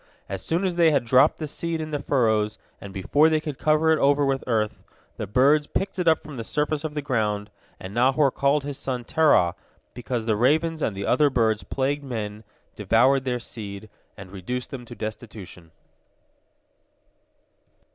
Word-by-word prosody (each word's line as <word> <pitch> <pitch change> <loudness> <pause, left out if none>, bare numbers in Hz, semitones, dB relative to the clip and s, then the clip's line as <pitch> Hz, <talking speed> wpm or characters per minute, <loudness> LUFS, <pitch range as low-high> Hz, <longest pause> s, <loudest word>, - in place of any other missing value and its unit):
As 95 -1 -5
soon 170 +4 -1
as 180 -2 -2
they 170 -2 +5
had 140 -5 +1
dropped 125 +3 +4
the 155 - -4
seed 165 +2 -3
in 155 0 -5
the 145 -1 -2
furrows, 110 -5 +1 0.2
and 100 - -8
before 100 - +3
they 155 -1 +2
could 150 -3 -6
cover 155 +1 +3
it 160 - +3
over 145 +1 +3
with 135 -1 0
earth, 110 -3 -1 0.3
the - - -4
birds 140 +8 +3
picked 195 -1 -3
it 180 - -1
up 160 -1 +3
from 150 -3 -9
the 115 - -4
surface 150 +4 -1
of 155 -1 -5
the 150 - -3
ground, 105 -6 -1 0.3
and 95 +1 -8
Nahor 130 +4 +3
called 140 +2 +1
his 140 -1 -5
son 125 -2 -3
Terah, 120 - +3 0.4
because 120 -1 -4
the 110 -2 +1
ravens 155 +7 +1
and 100 -8 -1
the 100 - -3
other 145 +4 +3
birds 110 -5 +1
plagued 140 +8 -2
men, 110 -5 -5 0.3
devoured 125 +6 +3
their 125 -1 -1
seed, 105 -3 -8 0.3
and 95 -2 -11
reduced 120 +7 -5
them 125 -3 -7
to 120 - -10
destitution. 105 -6 -8
130 Hz, 180 wpm, -24 LUFS, 110-150 Hz, 0.4 s, they